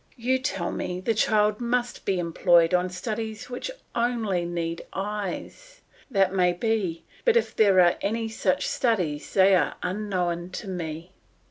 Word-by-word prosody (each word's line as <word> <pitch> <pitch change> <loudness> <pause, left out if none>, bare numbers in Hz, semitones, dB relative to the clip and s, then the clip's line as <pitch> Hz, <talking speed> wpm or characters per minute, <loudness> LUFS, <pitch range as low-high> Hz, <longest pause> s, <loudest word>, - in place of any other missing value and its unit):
You 255 +2 +1
tell 195 -9 -2
me 180 0 -3
the 205 +5 0
child 210 0 +2
must 240 +1 -1
be 195 - +1
employed 170 0 +3
on 180 0 +2
studies 220 +5 -5
which 245 - -4 0.2
only 225 -7 0
need 170 -1 -3
eyes. 210 - -5 0.3
That 195 -5 +2
may 180 -2 +3
be; 190 -4 -1 0.2
but 475 -1 +4
if 470 - 0
there 200 -4 +5
are 175 0 +4
any 225 +2 -1
such 185 -4 0
studies, 180 - 0
they 195 0 +6
are 185 - +2
unknown 180 -3 -2
to 200 - -6
me. 170 -2 -5
195 Hz, 150 wpm, -26 LUFS, 180-225 Hz, 0.3 s, they